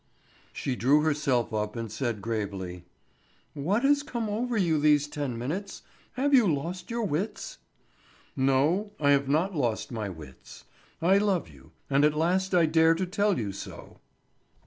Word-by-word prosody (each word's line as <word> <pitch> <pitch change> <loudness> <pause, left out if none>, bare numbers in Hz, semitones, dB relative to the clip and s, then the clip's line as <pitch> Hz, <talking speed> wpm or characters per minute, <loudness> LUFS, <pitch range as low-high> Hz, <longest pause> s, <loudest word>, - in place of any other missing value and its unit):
She 130 - -3
drew 140 +5 +3
herself 145 -7 0
up 105 0 -2
and 115 -2 -5
said 115 -3 -3
gravely: 95 -6 -4 0.7
"What 190 - 0
has 285 +1 +4
come 235 -6 -4
over 235 +3 -1
you 165 -6 +2
these 150 -1 +3
ten 145 -5 -4
minutes; 175 - -5 0.3
have 280 +3 0
you 235 -9 +6
lost 170 +6 -4
your 235 0 -2
wits?" 200 +3 -3 0.8
"No, 150 +11 +1
I 145 -1 +3
have 140 -1 +2
not 165 +7 +1
lost 120 -6 -1
my 110 -4 -3
wits. 75 -7 -12 0.4
I 190 +3 +5
love 200 - 0
you, 70 -3 -18 0.2
and 140 +1 +2
at 150 0 +3
last 185 +4 +1
I 170 -2 +5
dare 160 +1 +4
to 185 +3 -1
tell 200 +2 +1
you 105 -4 -2
so." 95 - -10
150 Hz, 160 wpm, -27 LUFS, 120-190 Hz, 0.8 s, you